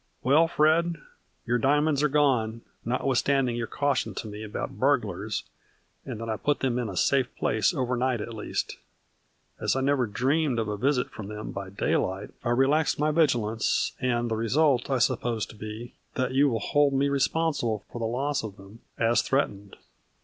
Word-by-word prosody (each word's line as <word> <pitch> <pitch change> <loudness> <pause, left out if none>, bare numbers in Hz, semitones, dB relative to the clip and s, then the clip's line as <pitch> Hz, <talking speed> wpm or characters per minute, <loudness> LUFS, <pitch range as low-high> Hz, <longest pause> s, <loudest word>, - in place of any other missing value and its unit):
" - - -42
Well, 150 +6 +5
Fred, 165 +2 +2 0.5
your 120 +1 +1
diamonds 145 +3 +2
are 150 - +3
gone, 125 -6 +2 0.2
not 125 +3 -2
withstanding 135 -1 +2
your 120 -1 -2
caution 140 -2 -1
to - - -5
me 105 0 -7
about 105 -1 -5
burglars, 110 -7 0 0.6
and - - -5
that 115 - -5
I 110 -1 -2
put 145 +6 0
them 125 -2 0
in 120 -3 -2
a 95 - -6
safe 135 +7 +3
place 110 -2 +1
over 125 -1 -1
night 125 -1 0
at 115 +3 -5
least. 105 - -3 0.8
As - - 0
I 135 - 0
never 135 -3 +2
dreamed 135 +5 +1
of 110 -1 -1
a 105 - -2
visit 130 +4 0
from 110 -3 -8
them 105 0 -6
by 100 -1 -6
daylight, 95 0 -1
I 120 - -1
relaxed 135 +6 +2
my 150 +1 +1
vigil 140 -9 +2
ance, 110 +1 0
and 120 -2 +1
the - - +1
result 125 +4 +2
I 135 - +2
suppose 120 -3 0
to - - -14
be, 110 +3 -8 0.2
that 130 0 -1
you 140 +2 +4
wild 115 -4 -2
hold 145 -1 +4
me 135 +1 +2
responsible 140 -6 0
for 120 - -6
the 115 - -1
loss 135 +4 -1
of 105 -3 -7
them, 100 +3 -14 0.2
as 115 0 +3
threatened. 100 -7 -2
125 Hz, 190 wpm, -27 LUFS, 110-140 Hz, 0.8 s, Well